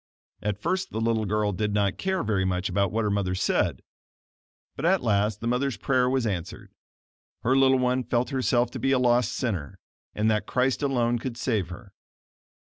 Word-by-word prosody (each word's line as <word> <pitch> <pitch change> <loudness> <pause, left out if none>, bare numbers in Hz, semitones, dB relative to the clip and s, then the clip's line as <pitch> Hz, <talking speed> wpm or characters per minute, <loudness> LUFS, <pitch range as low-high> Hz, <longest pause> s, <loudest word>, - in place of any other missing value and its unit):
At 105 -1 -2
first 185 - -1
the 110 - -4
little 115 -1 +1
girl 105 0 0
did 105 +2 -2
not 100 -2 0
care 190 -1 -1
very 105 -3 0
much 90 0 -1
about 100 0 +1
what 115 +2 0
her 105 - 0
mother 100 -2 0
said, 95 - 0 0.9
but 135 - -7
at 185 +2 +3
last 105 -1 +1
the 115 - -3
mother's 125 +2 0
prayer 125 -2 +1
was 130 -2 0
answered. 90 -4 -4 0.7
Her 130 +3 +3
little 135 0 +5
one 125 0 +1
felt 120 +1 -1
herself 125 -2 +1
to 130 - -6
be 135 +4 +1
a - - +4
lost 125 -1 +3
sinner, 95 - -3 0.4
and 105 +1 +1
that 105 -1 -1
Christ 130 +2 +1
alone 120 -4 +1
could 120 0 -5
save 110 -9 -1
her. 95 +2 -11
115 Hz, 190 wpm, -26 LUFS, 105-130 Hz, 0.9 s, little